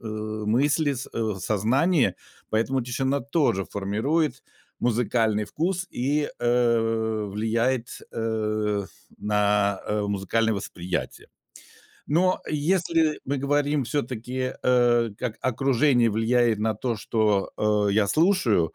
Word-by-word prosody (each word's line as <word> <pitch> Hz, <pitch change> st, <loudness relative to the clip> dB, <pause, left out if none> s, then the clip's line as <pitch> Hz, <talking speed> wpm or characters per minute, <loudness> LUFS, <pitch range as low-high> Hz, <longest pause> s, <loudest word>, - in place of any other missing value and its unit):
э, -, -, -19 dB
мысли 110 Hz, +8 st, 0 dB
с 130 Hz, 0 st, -5 dB
э, -, -, -5 dB
в 110 Hz, -4 st, -1 dB
сознании, 125 Hz, -, +2 dB, 0.4 s
поэтому 120 Hz, +4 st, 0 dB
тишина 130 Hz, +3 st, -1 dB
тоже 140 Hz, -, +1 dB
формирует 125 Hz, -, -1 dB, 0.4 s
музыкальный 110 Hz, -2 st, +1 dB
вкус 180 Hz, -, -2 dB
и, 145 Hz, +4 st, 0 dB
э, 115 Hz, -2 st, +1 dB
влияет, 115 Hz, +4 st, -1 dB
э, 110 Hz, -2 st, -1 dB, 0.3 s
на, 105 Hz, -1 st, +1 dB
э, 105 Hz, 0 st, -1 dB
музыкальное 105 Hz, +3 st, 0 dB
восприятие. 90 Hz, -2 st, -5 dB, 0.8 s
Но 185 Hz, +5 st, +2 dB
если 160 Hz, 0 st, +1 dB
мы 140 Hz, +2 st, -1 dB
говорим 145 Hz, 0 st, +1 dB
все-таки, 130 Hz, -1 st, -3 dB
э, 120 Hz, -2 st, +3 dB
как 120 Hz, -3 st, -3 dB
окружение 130 Hz, -1 st, +2 dB
влияет 115 Hz, +1 st, +2 dB
на 110 Hz, 0 st, 0 dB
то, 115 Hz, +2 st, -2 dB
что, 105 Hz, -3 st, 0 dB, 0.4 s
э, -, -, +1 dB
я 105 Hz, 0 st, +3 dB
слушаю, 130 Hz, -, +2 dB
115 Hz, 110 wpm, -25 LUFS, 110-140 Hz, 0.8 s, э